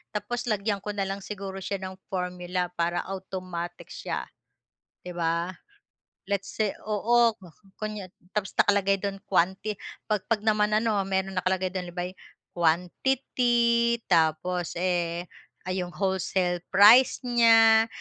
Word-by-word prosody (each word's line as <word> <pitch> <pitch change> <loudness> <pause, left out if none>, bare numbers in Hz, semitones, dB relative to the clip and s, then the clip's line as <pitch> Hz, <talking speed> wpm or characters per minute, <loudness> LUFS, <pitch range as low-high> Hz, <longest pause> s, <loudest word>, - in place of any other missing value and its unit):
Tapos 235 +4 -3
lagyan 205 -1 0
ko 210 - -3
na 195 -1 -1
lang 195 +1 -3
siguro 195 -2 -6
siya 200 +1 -3
ng 185 0 -6 0.2
formula 180 -1 -2
para 170 +1 0
automatic 185 -2 -6
siya, - - -4 0.8
'di 180 - -6
ba? 170 +2 -1 0.7
Let's 200 -1 -3
say 215 -2 +1 0.2
oo 230 +2 +3 0.4
kunya 210 -3 -4 0.3
tapos 195 -2 -2
nakalagay 200 -1 +4
do'n 195 0 -4
quanti 190 +3 +1 0.3
'pag 210 -3 0
'pag 225 -2 +1
naman 210 -1 +3
ano 215 -2 +2
may 190 0 +1
nakalagay 185 0 -1
do'n, 180 -2 -4
halimbawa 180 +1 -4
eh, - - -44 0.4
quantity 235 +7 +2
tapos, 170 +1 +1
eh, 175 -1 -1 0.4
'yong 185 -1 -2
wholesale 190 -2 0
price 220 +7 +7
niya, 225 -2 +6
195 Hz, 125 wpm, -27 LUFS, 180-215 Hz, 0.8 s, price